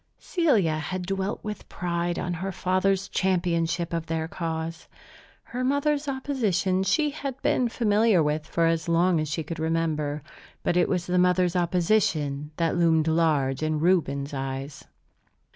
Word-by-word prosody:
Celia 220 - +1
had 180 +4 -4
dwelt 195 +1 -2
with 210 -1 -6
pride 175 -1 -2
on 175 - -2
her 190 +3 -3
father's 185 +1 0
championship 175 -2 0
of 165 -1 -2
their 160 0 -2
cause. 165 -1 -4 0.6
Her 250 +2 -4
mother's 285 +2 +1
opposition 220 -9 0
she 295 +10 +2
had 275 -3 -5
been 245 -2 +2
familiar 215 -5 +3
with 150 +1 -1
for 165 0 +1
as 165 0 0
long 170 0 +3
as 155 -1 -2
she 155 +2 -2
could 160 +1 -6
remember. 155 -3 -1 0.4
But - - +1
it 180 - +3
was 180 -2 0
the 180 0 +1
mother's 180 0 +3
opposition 170 -5 +1
that 165 0 +1
loomed 165 -2 +3
large 155 -5 +2
in 155 -1 0
Reuben's 150 -5 +1
eyes. 135 +1 -5
175 Hz, 150 wpm, -26 LUFS, 160-195 Hz, 0.6 s, familiar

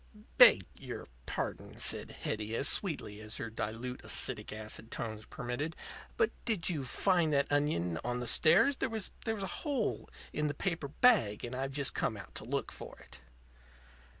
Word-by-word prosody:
"Beg 230 - +9
your - - -7 0.2
pardon," - - -4
said - - 0
Hetty, 110 +1 -2
as 140 - +2
sweetly 140 - +1
as 110 0 -5
her 115 - -5
dilute 115 +3 -4
acetic - - +2
acid 110 +1 -5
tones 110 -2 -5
permitted, 125 +7 -4 0.4
"but 450 -2 +3
did 215 -8 0
you 150 -5 -2
find 170 +4 +2
that 140 0 +1
onion 90 - +1
on 125 0 -2
the 125 - -4
stairs? 175 - +5
There - - -1
was 220 -4 -3 0.2
a 220 -3 -1 0.2
hole 275 -8 -1 0.2
in 150 0 0
the 145 - -3
paper 165 -3 -2
bag; 145 - +3
and 120 - -6
I've 135 +1 -3
just 140 -1 +3
come - - -1
out - - -11
to - - -5
look - - -2
for - - -10
it." 65 0 -15
140 Hz, 170 wpm, -32 LUFS, 110-180 Hz, 0.4 s, Beg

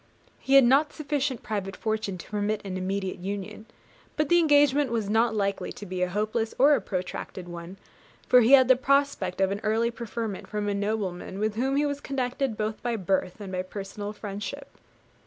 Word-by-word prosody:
He 270 - +2
had 275 - +9
not 275 +5 +4
sufficient 280 -4 -2
private 195 -3 -3
fortune 215 -4 -2
to 170 - -11
permit 210 0 -1
an 190 -1 -4
immediate 190 0 -3
union; 205 +3 -6 0.5
but 305 -1 +1
the 345 - +6
engagement 290 -3 +4
was 220 -3 -1
not 225 +1 +3
likely 200 -1 -1
to 205 - -9
be 185 -1 -4
a 180 - +1
hopeless 215 +3 -1
or 285 +3 +6
a - - +2
protracted 185 -1 -5
one, 175 +2 -8 0.5
for 250 - +7
he 240 +4 +4
had 260 -2 +8
a - - +7
prospect 260 -8 +1
of 195 0 +2
early 225 +2 +1
preferment 230 -3 -5
from 210 -1 -3
a 205 - 0
nobleman 200 -3 -3
with 215 +1 0
whom 260 +5 0
he 290 +1 +2
was 285 -1 -2
connected 260 -3 -2
both 215 0 -3
by 240 -1 -1
birth 190 -1 -1
and 200 -2 -7
by 185 -1 -1
personal 200 +2 -6
friendship. 210 +6 -6
215 Hz, 190 wpm, -27 LUFS, 195-260 Hz, 0.5 s, had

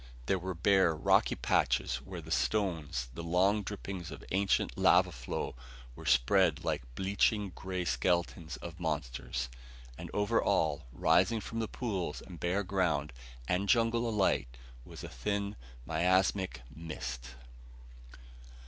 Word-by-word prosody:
There 95 - +1
were 95 +1 -4
bare, 95 -1 +4
rocky 75 - +3
patches - - +1
where 85 +7 -8
the 80 +1 -10
stones, 80 - 0
the 85 - -6
long 90 +5 +2
drippings 95 -3 -6
of - - -9
ancient 100 +1 +1
lava - - +5
flow, - - -4 0.4
were - - -9
spread 75 +7 +4
like - - 0
bleaching 100 - +1
gray 95 -1 -4
skeletons 85 -2 0
of 85 0 -7
monsters. 65 -6 -2 0.5
And - - -7
over 105 -1 +2
all, 75 -3 +1
rising 115 - +3
from 115 +2 -5
pools 95 - -3
and 90 -2 -11
bare 90 +4 0
ground 90 -7 0 0.3
and 95 +5 0
jungle 115 0 +3
alike, 95 - +1 0.3
was - - -10
a - - -5
thin, 100 +10 -2 0.3
miasmic 95 -3 +1
mist. 65 -6 -6
90 Hz, 130 wpm, -32 LUFS, 75-100 Hz, 0.5 s, lava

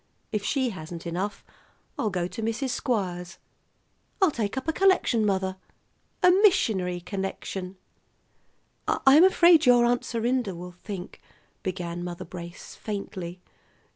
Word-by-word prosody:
If 210 -2 -1
she 260 +2 0
hasn't 165 -2 -8
enough, 185 +4 -3 0.5
I'll 215 - 0
go 180 -3 -1
to 185 - -6
Mrs. 230 +4 -1
Squires. 180 -10 -2 0.8
I'll 380 -5 +4
take 225 -2 -3
up 265 - -4
a 320 - +1
collection, 370 - +3
mother, 190 -2 0 0.7
a 360 - +8
missionary 220 - +3
collection." 190 0 -5 1.1
"I'm 280 +5 +6
afraid 345 -5 +6
your 245 -1 +6
Aunt 240 0 +2
Serinda 235 -3 -1
will 180 +1 -8
think 180 +1 -8 0.2
" - - -36
began 175 -2 -4
Mother 175 -1 -6
Brace 170 0 -9
faintly. 185 -4 -6
200 Hz, 130 wpm, -26 LUFS, 180-250 Hz, 1.1 s, a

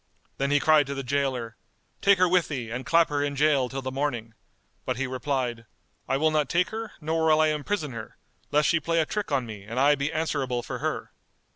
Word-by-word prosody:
Then 140 0 +1
he 145 0 +4
cried 155 -2 +4
to 140 - -4
the 135 - -4
gaoler, 130 -4 -1 0.4
"Take 200 -1 +5
her 185 0 +4
with 180 -1 +3
thee 125 -6 -4
and 125 +2 -5
clap 165 0 +4
her 145 -1 0
in 145 0 -2
gaol 140 -3 +3
till 135 +1 -5
the 130 - -3
morning;" 130 -5 -2 0.5
but 130 -1 -2
he 135 - -1
replied, 125 -3 -2 0.4
"I 135 - +2
will 155 +2 +2
not 150 -3 +1
take 175 +1 +2
her 225 0 -5
nor 160 +1 0
will 155 0 +5
I 155 0 +4
imprison 150 +1 -2
her 110 -2 -8 0.3
lest 150 0 +3
she 170 - +3
play 165 +2 0
a 160 - +2
trick 210 0 -3
on 135 -3 +1
me 105 -3 -8
and 115 +5 -4
I 145 +2 +5
be 140 +1 -1
answerable 140 -6 -1
for - - -5
her." - - -3
140 Hz, 230 wpm, -26 LUFS, 130-155 Hz, 0.5 s, Take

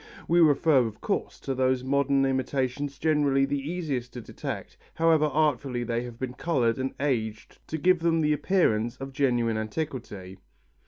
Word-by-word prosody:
We 170 +1 +3
refer, 150 -2 +5
of 110 - -9
course, - - -3
to 135 - -2
those 130 -1 +1
modern 140 0 +2
imitations 135 +1 -1
generally 145 -3 +2
the 140 +1 -1
easiest 140 -5 -4
to 125 - -6
detect, - - -6 0.2
however 160 -2 +3
artfully 140 -5 0
they 120 0 -1
have 120 -1 -9
been 125 0 -4
coloured 125 -5 0
and 130 0 -3
aged 115 -6 -2
to 160 - -3
give 180 +3 +3
them 165 -1 +2
the 150 0 +2
appearance 125 - +1
of 135 0 -7
genuine 120 -5 +1
antiquity. 110 - -5
135 Hz, 160 wpm, -27 LUFS, 120-150 Hz, 0.2 s, refer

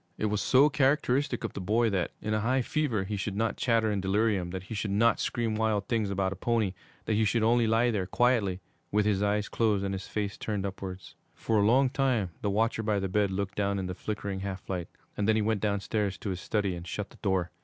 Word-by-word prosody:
It - - -1
was 105 - 0
so 135 +3 +5
characteristic 135 -1 +1
of - - -3
the - - -5
boy 110 +4 +2
that, 95 -3 0
in 110 - -1
a 110 - +2
high 125 +4 +1
fever, 125 -8 0
he 105 +2 -3
should 100 0 -3
not 110 +1 0
chatter 115 -3 +2
in 100 -2 -1
delirium, 95 -1 +1
that 95 0 -5
he 100 - -8
should 105 0 -2
not 115 +4 +3
scream 115 -2 -1
wild 110 -2 0
things 110 -4 0
about 95 -1 0
a - - -9
pony, 110 -3 0 0.3
that 110 - 0
he 110 +1 +3
should 110 +2 +1
only 115 +1 +3
lie 115 +2 +3
there 95 -5 -1
quietly, 105 -6 +1 0.3
with 105 0 +2
his 100 -2 +1
eyes 105 0 +1
closed 105 -4 +1
and 100 - -2
his 95 0 -5
face 105 -2 -3
turned 105 -3 -2
upwards. 95 -1 -6 0.2
For 110 -2 0
a 100 - +4
long 130 +4 +5
time 130 -9 +1
the 105 - 0
watcher 110 +2 +1
by 105 -1 0
the 95 -1 -1
bed 100 +1 +2
looked 95 0 -2
down 100 -1 0
in 95 - -2
the 90 - -3
flickering 100 0 -4
half 95 -1 -5
light, 90 -3 -3 0.3
and 105 - -1
then 110 - +4
he 110 - +2
went 110 -1 0
downstairs 100 -1 -1
to 100 - -4
his 90 -1 -5
study 100 -2 0
and 85 0 -7
shut 105 +4 -4
the - - -16
door. 95 -4 0
105 Hz, 245 wpm, -29 LUFS, 95-115 Hz, 0.3 s, so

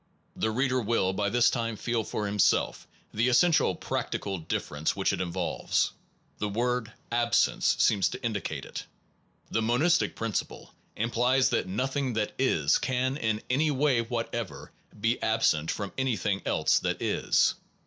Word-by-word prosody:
The 110 - 0
reader 130 +3 +1
will 105 -4 +1
by 100 +1 0
this 120 +2 +4
time 115 -2 -2
feel 120 0 -1
for 105 0 -3
himself 100 -1 +1 0.3
the 115 +4 +2
essential 155 +7 +4
practical 95 -3 -3
difference 75 -1 -2
which - - +1
it - - -2
involves. 90 -1 -1 0.5
The 105 - -1
word 120 +1 -1 0.2
absence 120 0 +2
seems 100 -5 +3
to - - -7
in 115 - 0
dicate 100 - -4
it. - - -7 0.7
The 115 - +1
monistic 130 +10 +2
principle 115 -2 -4 0.2
implies 120 +4 +2
that - - 0
nothing 130 +6 -1
that 110 -1 -1
is 80 - +3
can 130 +1 0
in 110 -6 -1
any 145 +5 +2
way 140 -3 +2
whatever 115 0 -4 0.3
be 115 +3 0
absent 85 -8 +2
from 100 -2 -3
anything 105 -6 0
else - - +3
that - - -2
is. - - +2
115 Hz, 150 wpm, -28 LUFS, 105-125 Hz, 0.7 s, this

